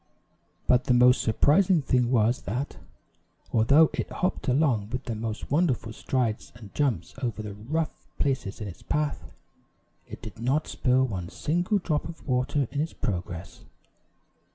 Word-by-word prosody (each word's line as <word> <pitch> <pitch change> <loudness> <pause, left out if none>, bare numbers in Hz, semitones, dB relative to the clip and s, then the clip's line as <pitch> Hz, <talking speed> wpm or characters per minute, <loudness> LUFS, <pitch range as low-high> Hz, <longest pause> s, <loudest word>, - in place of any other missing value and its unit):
But 125 0 +4
the 125 - +3
most 125 +1 +6
surprising 155 - +3
thing 125 -2 +2
was 120 -1 +2
that, 125 +9 -3 0.8
although 140 +8 +5
it - - -3
hopped 185 -3 -2
along 125 -6 +2
with 130 +2 -3
the 120 - -3
most 110 +1 -5
wonderful 140 -8 +1
strides 115 -2 -1
and 110 -4 -12
jumps 120 - 0
over 115 -4 -2
the 105 -1 -6
rough 150 +11 -3
places 130 -8 -1
in 105 - -4
its 90 - -9
path, 150 -1 -2 0.8
it - - -8
did 110 -1 -9
not 130 +6 +1
spill 130 +1 +2
one 90 -8 -4
single 175 - 0
drop 160 -5 -1
of 165 - -11
water 130 +1 +1
in 145 - -1
its 160 - -3
progress. 90 -7 -4
125 Hz, 155 wpm, -27 LUFS, 110-145 Hz, 0.8 s, most